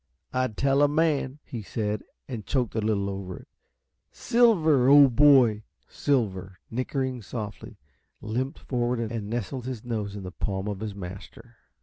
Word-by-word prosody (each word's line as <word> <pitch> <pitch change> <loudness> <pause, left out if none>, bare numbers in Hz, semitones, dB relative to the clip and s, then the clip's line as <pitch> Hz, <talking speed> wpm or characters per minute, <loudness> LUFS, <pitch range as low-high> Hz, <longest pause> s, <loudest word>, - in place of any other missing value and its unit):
"I'd 130 -5 -1
tell 140 +1 +3
a 145 - +6
man!" 145 -3 +1
he 115 - -7
said, 105 0 -3 0.3
and 120 -5 -5
choked 120 +4 -1
a 110 - -1
little 105 -2 0
over 95 -2 -5
it. - - -14 0.6
"Silver, 165 - +3
old 140 -3 +7
boy!" 130 -7 +6 0.3
Silver, 95 -9 -1
nickering 130 +1 -2
softly, 105 0 -7 0.4
limped 125 +5 -3
forward 120 -1 -1
and 115 -2 -3
nestled 120 +2 -4
his 125 -3 -6
nose 105 -4 -3
in 100 - -7
the 90 - -6
palm 95 +1 -3
of 100 -2 -3
his 105 -2 -5
master. 95 0 -10
115 Hz, 150 wpm, -26 LUFS, 105-135 Hz, 0.6 s, old